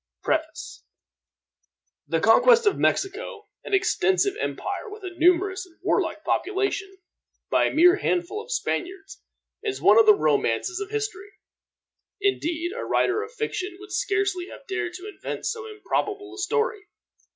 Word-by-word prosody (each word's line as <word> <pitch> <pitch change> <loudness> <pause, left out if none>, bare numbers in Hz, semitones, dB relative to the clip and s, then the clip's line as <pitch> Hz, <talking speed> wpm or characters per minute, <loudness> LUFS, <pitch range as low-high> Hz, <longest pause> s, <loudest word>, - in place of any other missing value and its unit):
Preface. - - -3 1.2
The 165 - 0
conquest 460 - +5
of 415 - +4
Mexico, 420 +2 -1 0.2
an - - 0
extensive 380 +1 +2
empire 450 - -4
with 420 0 -11
a 370 -1 -6
numerous 365 +3 +3
and 335 - -24
warlike - - 0
population, 390 0 -1 0.5
by - - +4
a - - -2
mere 355 +4 +6
handful 370 +4 -1
of 465 +2 -11
Spaniards, 390 -4 -3 0.4
is 415 -3 -3
one - - +6
of 445 - +5
the 425 - +9
romances 370 -1 0
of 405 -1 -5
history. 415 -2 -4 0.9
Indeed, 345 -4 -1
a - - -4
writer 395 +3 +1
of 440 +1 -7
fiction 405 -6 -4
would 405 0 -12
scarcely 390 -3 0
have - - -12
dared 350 -4 -3
to 370 +3 -8
invent 415 - -6
so 450 -1 -3
improbable 410 -2 -3
a 395 - -9
story. 440 +1 -1
395 Hz, 145 wpm, -25 LUFS, 370-425 Hz, 1.2 s, the